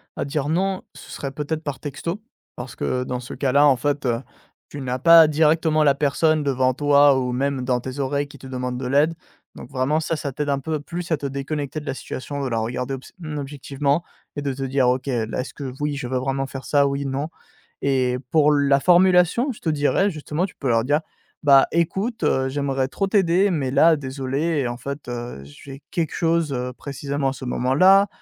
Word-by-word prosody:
à -, -, -3 dB
dire 145 Hz, 0 st, -2 dB
«Non», 190 Hz, +3 st, 0 dB
ce -, -, -13 dB
serait 140 Hz, -, -5 dB
peut-être 150 Hz, +3 st, -4 dB
par 145 Hz, -4 st, -4 dB
texto 155 Hz, +7 st, -5 dB, 0.3 s
parce 125 Hz, -2 st, -8 dB
que 125 Hz, +2 st, -1 dB
dans 125 Hz, -1 st, -4 dB
ce 125 Hz, -, -8 dB
cas-là, 140 Hz, +1 st, +3 dB
en 140 Hz, -3 st, +5 dB
fait, 145 Hz, +3 st, -1 dB
heu, 120 Hz, -1 st, 0 dB, 0.5 s
tu 145 Hz, -, -8 dB
n'as 125 Hz, -1 st, -3 dB
pas 165 Hz, +1 st, +8 dB
directement 155 Hz, +1 st, +3 dB
la 140 Hz, -2 st, +4 dB
personne 150 Hz, +2 st, +2 dB
devant 130 Hz, -2 st, +1 dB
toi 145 Hz, -1 st, +5 dB
ou 125 Hz, -1 st, -2 dB
même 135 Hz, +1 st, -1 dB
dans 125 Hz, -1 st, +1 dB
tes 130 Hz, +2 st, -7 dB
oreilles 140 Hz, +1 st, -1 dB
qui 145 Hz, -, -13 dB
te -, -, -14 dB
demandent 125 Hz, -1 st, -4 dB
de 130 Hz, -, -5 dB
l'aide. 150 Hz, +5 st, +2 dB, 0.4 s
Donc -, -, -10 dB
vraiment 135 Hz, +3 st, 0 dB
ça, 160 Hz, +1 st, -2 dB
ça 145 Hz, -2 st, -4 dB
t'aide 145 Hz, +3 st, -3 dB
un 140 Hz, -1 st, +1 dB
peu 155 Hz, +3 st, -3 dB
plus 170 Hz, +4 st, -6 dB
à 160 Hz, -, +3 dB
te 140 Hz, -, -7 dB
déconnecter 140 Hz, +2 st, -3 dB
de -, -, -13 dB
la 135 Hz, -, -2 dB
situation, 140 Hz, +2 st, -6 dB
de -, -, -1 dB
la 115 Hz, -2 st, -1 dB
regarder 125 Hz, +4 st, -3 dB
obs 135 Hz, -1 st, -8 dB
mmh, 155 Hz, -3 st, -6 dB
objectivement 140 Hz, +1 st, -1 dB, 0.4 s
et -, -, -1 dB
de 140 Hz, -2 st, -2 dB
te 135 Hz, +1 st, -5 dB
dire: 135 Hz, -1 st, +1 dB
«OK, 125 Hz, +2 st, -1 dB
là 120 Hz, -2 st, -1 dB
est-ce 130 Hz, -, -8 dB
que 140 Hz, -, -7 dB
voui 145 Hz, -1 st, -1 dB
je 125 Hz, -, -4 dB
veux 130 Hz, +1 st, -1 dB
vraiment 135 Hz, +1 st, -1 dB
faire 135 Hz, -1 st, -7 dB
ça? 140 Hz, +2 st, +3 dB
Oui, 140 Hz, 0 st, -2 dB
non» 135 Hz, +3 st, -2 dB, 0.6 s
et 130 Hz, -2 st, +1 dB
pour 150 Hz, -2 st, +4 dB
la 140 Hz, -1 st, +3 dB
formulation, 180 Hz, -, +4 dB
je 225 Hz, -, -10 dB
te -, -, -7 dB
dirais 155 Hz, +7 st, +2 dB
justement, 155 Hz, +2 st, -2 dB
tu 190 Hz, -, -11 dB
peux 135 Hz, -, -3 dB
leur 115 Hz, 0 st, +2 dB
dire: 145 Hz, +3 st, +2 dB, 0.4 s
«Bah 140 Hz, -2 st, +6 dB
écoute, 190 Hz, +8 st, -1 dB
heu, 130 Hz, 0 st, +2 dB
j'aimerais 135 Hz, -1 st, -1 dB
trop 195 Hz, +7 st, -2 dB
t'aider 195 Hz, 0 st, +3 dB
mais 140 Hz, -7 st, -1 dB
là 160 Hz, +3 st, +5 dB
désolé, 135 Hz, +2 st, -2 dB
en 120 Hz, -, -5 dB
fait, 140 Hz, +1 st, -7 dB
heu, 120 Hz, -, -6 dB
j'ai 135 Hz, -, -12 dB
quelque 165 Hz, -3 st, -1 dB
chose, 165 Hz, -3 st, +1 dB
heu, 125 Hz, 0 st, -3 dB
précisément 140 Hz, +1 st, -3 dB
à -, -, -4 dB
ce 135 Hz, -, -10 dB
moment-là» 165 Hz, +11 st, +4 dB
140 Hz, 215 wpm, -22 LUFS, 130-155 Hz, 0.6 s, pas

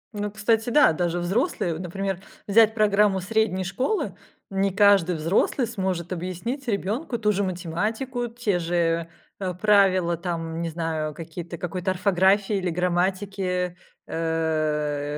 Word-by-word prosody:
Ну, 205 Hz, 0 st, -2 dB
кстати, 225 Hz, +2 st, +1 dB
да, 290 Hz, -, +5 dB
даже 175 Hz, +1 st, -1 dB
взрослые. 185 Hz, -, 0 dB
Вот, 160 Hz, -, -6 dB
например, 190 Hz, +1 st, -3 dB, 0.3 s
взять 220 Hz, +1 st, +5 dB
программу 210 Hz, -2 st, +3 dB
средней 205 Hz, -1 st, 0 dB
школы. 260 Hz, -, -1 dB, 0.4 s
Не 195 Hz, 0 st, +1 dB
каждый 195 Hz, -3 st, +4 dB
взрослый 170 Hz, -, +1 dB
сможет 190 Hz, -6 st, -3 dB
объяснить 185 Hz, -, -4 dB
ребенку 225 Hz, -, -1 dB
ту 210 Hz, -2 st, +2 dB
же 200 Hz, 0 st, 0 dB
математику, 210 Hz, +8 st, -2 dB
те 230 Hz, -6 st, -1 dB
же, 170 Hz, -1 st, 0 dB, 0.3 s
э, 185 Hz, -2 st, -2 dB
правила, 185 Hz, -3 st, +3 dB
там, 165 Hz, -1 st, -4 dB
не 170 Hz, -, -2 dB
знаю, 160 Hz, -2 st, -3 dB
какие-то, 170 Hz, +1 st, -7 dB
какой-то 180 Hz, +2 st, -2 dB
орфографии 195 Hz, +2 st, +2 dB
или 185 Hz, -2 st, -1 dB
грамматики, 180 Hz, +1 st, -1 dB, 0.3 s
э. 155 Hz, -3 st, -1 dB
185 Hz, 130 wpm, -25 LUFS, 170-210 Hz, 0.4 s, да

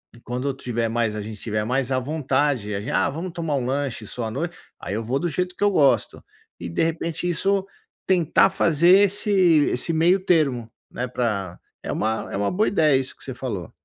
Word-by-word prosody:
E -, -, -15 dB
quando 125 Hz, +3 st, -4 dB
eu -, -, -1 dB
tiver 120 Hz, -3 st, -2 dB
mais 115 Hz, -2 st, 0 dB
a 105 Hz, -, -3 dB
gente 105 Hz, 0 st, -8 dB
tiver 105 Hz, -1 st, -2 dB
mais 125 Hz, +3 st, -1 dB
à 130 Hz, -, +2 dB
vontade, 135 Hz, -5 st, 0 dB
a -, -, -2 dB
gente -, -, -5 dB
"Ah -, -, +2 dB
vamos 165 Hz, +6 st, -5 dB
tomar 165 Hz, -4 st, -2 dB
lanche 130 Hz, -2 st, -2 dB
só 120 Hz, +2 st, -4 dB
à 110 Hz, -, -4 dB
noite", 165 Hz, +7 st, -4 dB, 0.2 s
aí -, -, -5 dB
eu 115 Hz, -, -2 dB
vou 125 Hz, +5 st, -1 dB
do 175 Hz, -, -1 dB
jeito 180 Hz, +2 st, -2 dB
que -, -, -3 dB
eu 205 Hz, -, +4 dB
gosto. 145 Hz, -7 st, +2 dB, 0.4 s
E -, -, -5 dB
de 85 Hz, -, 0 dB
repente 165 Hz, +1 st, -2 dB
isso 195 Hz, +3 st, +1 dB, 0.4 s
tentar 180 Hz, 0 st, +4 dB
fazer 170 Hz, -3 st, +2 dB, 0.2 s
esse 205 Hz, +1 st, -2 dB, 0.4 s
esse 165 Hz, +7 st, -1 dB
meio 170 Hz, +4 st, +4 dB
termo, 135 Hz, -10 st, +2 dB, 0.2 s
né 125 Hz, -, -3 dB
pra 105 Hz, -8 st, -2 dB, 0.2 s
É -, -, -4 dB
uma 110 Hz, +1 st, -2 dB
é -, -, -1 dB
uma 100 Hz, 0 st, 0 dB
boa 210 Hz, +4 st, +1 dB
ideia 155 Hz, -7 st, +3 dB
isso 130 Hz, -, -6 dB
que -, -, -16 dB
você 130 Hz, -, -6 dB
falou. 110 Hz, -, -5 dB
135 Hz, 215 wpm, -23 LUFS, 115-165 Hz, 0.4 s, eu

